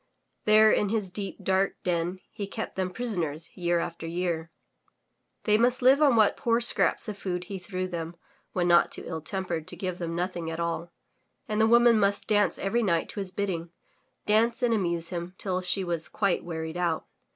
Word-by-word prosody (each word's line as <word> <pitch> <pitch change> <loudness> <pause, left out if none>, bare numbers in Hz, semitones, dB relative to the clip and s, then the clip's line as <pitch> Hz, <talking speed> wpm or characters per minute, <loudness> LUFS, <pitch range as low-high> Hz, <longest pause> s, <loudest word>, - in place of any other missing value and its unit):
There 215 0 +7
in 205 - +2
his 210 -4 -1
deep, 195 0 -5
dark 190 +1 +1
den 175 +1 -1
he 205 -3 -5
kept - - -5
them 185 -1 -1
prisoners 175 -8 -3
year 175 -1 +1
after 165 -1 -4
year. 170 -1 -2 0.9
They 210 0 +3
must 245 +2 +2
live 270 +4 +6
on 280 -5 +5
what 215 -2 +4
poor 230 0 +1
scraps 240 - +2
of 205 -2 -5
food 180 -2 -3
he 190 +1 -6
threw 185 0 -4
them 170 -1 -5 0.4
when 175 -2 0
not 175 0 +5
too - - -6
ill 160 -2 -4
tempered 175 -2 -3
to - - -4
give 185 -2 -4
them 165 -1 -3
nothing 175 -2 -2
at 165 0 -5
all, 170 0 -2 0.6
and 215 -1 0
the 220 - +5
woman 235 -1 +6
must 200 0 +2
dance 205 -2 +2
every 225 +5 0
night 170 -7 +1
to - - -6
his 195 -2 -4
bidding, 185 -4 -3 0.6
dance 230 +3 +2
and 235 -1 +3
amuse 170 -5 -1
him 175 0 -5
till 185 -2 -1
she 185 +2 0
was 170 -3 -2
quite 200 -3 0
wearied 160 -1 -5
out. 170 -3 0
185 Hz, 195 wpm, -27 LUFS, 170-210 Hz, 0.9 s, There